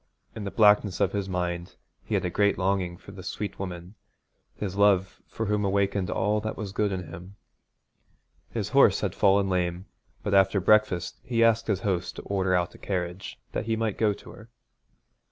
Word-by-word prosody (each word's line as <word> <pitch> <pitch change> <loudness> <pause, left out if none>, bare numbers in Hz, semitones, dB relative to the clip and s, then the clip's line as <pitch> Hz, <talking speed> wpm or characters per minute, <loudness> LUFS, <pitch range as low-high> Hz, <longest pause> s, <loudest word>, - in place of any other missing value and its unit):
In 105 - -6
the - - -2
blackness 105 -2 +4
of - - +2
his 100 -1 -3
mind 85 -1 -3 0.3
he - - -2
had - - 0
a 90 - -1
great 100 +3 +2
longing 95 -2 0
for - - -13
the - - -10
sweet 105 -1 -5
woman, 90 -1 -6 0.6
his 95 -3 -4
love 100 -2 +2
for 110 - -4
whom 105 0 0
awakened 100 -1 0
all 105 +3 0
that 110 0 -4
was 105 -3 -5
good 105 +1 0
in 95 -1 -3
him. 90 +4 -10 1.1
His - - -3
horse - - +5
had - - -1
fallen 100 0 +3
lame, 90 0 -1 0.4
but 100 - -1
after 95 0 +4
breakfast 95 -3 +2
he 115 -2 +1
asked 115 0 +3
his 100 -4 0
host 95 -4 -2
to - - -8
order 95 -2 0
out 90 -1 0
a - - -15
carriage 90 -1 -4
that 110 - -3
he 115 - +1
might 110 -2 -2
go 110 -2 +3
to 100 - -9
her. 110 - -14
100 Hz, 190 wpm, -27 LUFS, 90-105 Hz, 1.1 s, horse